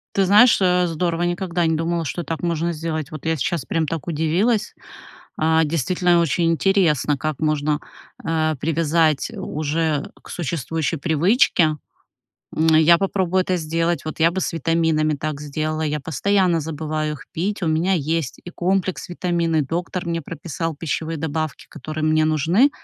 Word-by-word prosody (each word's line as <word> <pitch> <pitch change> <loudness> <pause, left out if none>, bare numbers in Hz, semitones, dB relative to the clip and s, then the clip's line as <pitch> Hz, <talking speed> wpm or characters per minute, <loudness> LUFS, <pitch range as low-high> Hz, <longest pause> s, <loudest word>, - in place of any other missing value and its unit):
Ты 195 - +3
знаешь, 210 +5 +6
э, 180 -1 +3
здорово, 165 +1 -1
я 175 - +1
никогда 175 -1 -1
не 160 0 +2
думала, 165 +1 -1
что 170 +4 -3
так 165 +1 -5
можно 170 0 0
сделать. 155 -2 -4
Вот 155 0 -8
я 160 0 +1
сейчас 145 +1 -2
прям 160 -2 -1
так 165 -1 -4
удивилась. 175 +8 +1 0.6
А, 160 +1 +3
действительно, 170 +3 +2
очень 165 +1 +1
интересно, 165 -6 +2
как 155 -1 -3
можно, 150 -1 0 0.4
э, 155 -1 +1
привязать 160 +1 +1
у 185 -6 -5
уже 155 -1 -1
к - - -13
существующей 160 -1 -2
привычке. 160 - +3 0.8
М, 160 - +2
я 160 +2 +6
попробую 190 -1 +1
это 185 0 -1
сделать, 165 0 -1
вот 155 +1 -6
я 165 +1 +5
бы 190 +2 -3
с - - -2
витаминами 160 -1 +1
так 150 0 -4
сделала. 155 +2 -3
Я 150 -1 -1
постоянно 175 +4 +1
забываю 155 0 -3
их - - -12
пить. 195 +4 -2
У - - 0
меня 160 +4 +1
есть 160 -3 -2
и - - -6
комплекс 185 +1 -1
витаминный, 170 -3 0
доктор 175 +5 -3
мне 165 -1 -2
прописал 165 +1 -4
пищевые 160 +1 -3
добавки, 155 0 -3
которые 155 0 -5
мне 155 0 +3
нужны, 165 - +3
165 Hz, 165 wpm, -21 LUFS, 155-175 Hz, 0.8 s, знаешь